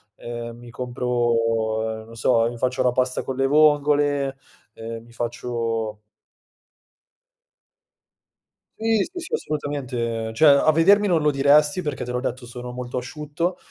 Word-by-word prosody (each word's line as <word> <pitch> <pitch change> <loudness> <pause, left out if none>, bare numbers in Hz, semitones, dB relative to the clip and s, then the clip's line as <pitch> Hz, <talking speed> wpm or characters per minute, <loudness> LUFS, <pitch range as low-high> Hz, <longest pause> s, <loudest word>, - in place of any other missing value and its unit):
ehm, 120 0 -7
mi 120 0 -12
compro, 115 -3 -1
ehm, - - -13
non 115 +1 -13
so, 115 0 +2
mi 120 - -8
faccio 130 +2 0
la 125 - +3
pasta 130 +1 0
con 130 - -4
le 135 - +2
vongole, 145 -2 +3 0.4
ehm, 115 0 -7
mi 120 - -18
faccio 115 -2 -3 2.8
Sì, 225 -2 +2
sì, 360 0 -7
sì, 345 +7 -8
assolutamente. 125 - -3
Cioè, 155 +7 +5
a 140 +3 +5
vedermi 195 +6 +5
non 170 -4 +2
lo 150 0 +3
diresti 145 +5 +4
perché 150 -6 -4
te 125 - -5
l'ho 125 0 -2
detto, 125 -1 -4
sono 125 +1 -8
molto 125 0 -5
asciutto, 150 +7 -3
125 Hz, 145 wpm, -23 LUFS, 115-145 Hz, 2.8 s, Cioè